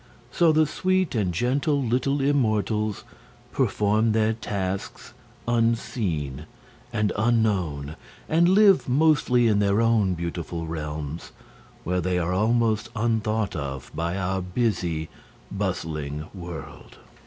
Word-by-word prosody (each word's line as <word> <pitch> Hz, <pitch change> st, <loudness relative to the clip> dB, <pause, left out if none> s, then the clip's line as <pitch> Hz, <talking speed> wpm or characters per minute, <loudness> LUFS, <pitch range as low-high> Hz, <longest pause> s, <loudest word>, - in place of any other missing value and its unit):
So 170 Hz, -2 st, +4 dB
the 155 Hz, 0 st, +4 dB
sweet 185 Hz, +4 st, 0 dB
and 105 Hz, -7 st, 0 dB
gentle 135 Hz, -, +1 dB
little 130 Hz, +3 st, 0 dB
immortals 110 Hz, -6 st, 0 dB, 0.5 s
perform 110 Hz, +2 st, +1 dB
their 110 Hz, 0 st, +2 dB
tasks 100 Hz, 0 st, -4 dB, 0.3 s
unseen 105 Hz, -, -1 dB, 0.4 s
and 105 Hz, -3 st, 0 dB
unknown, 100 Hz, -10 st, 0 dB, 0.3 s
and 170 Hz, +2 st, +3 dB
live 195 Hz, -5 st, +5 dB
mostly 130 Hz, -4 st, +3 dB
in 105 Hz, -2 st, +3 dB
their 100 Hz, +1 st, +2 dB
own 110 Hz, -5 st, +2 dB
beautiful 85 Hz, 0 st, -4 dB
realms, 75 Hz, -1 st, -5 dB, 0.5 s
where 90 Hz, +1 st, 0 dB
they 90 Hz, +1 st, 0 dB
are 90 Hz, +1 st, 0 dB
almost 110 Hz, +2 st, +1 dB
unthought 110 Hz, -2 st, 0 dB
of 70 Hz, -3 st, -5 dB
by 85 Hz, +3 st, -2 dB
our 95 Hz, 0 st, -1 dB
busy, 90 Hz, -5 st, -1 dB, 0.5 s
bustling 80 Hz, -6 st, -3 dB
world. 85 Hz, -5 st, -9 dB
105 Hz, 110 wpm, -25 LUFS, 85-120 Hz, 0.5 s, live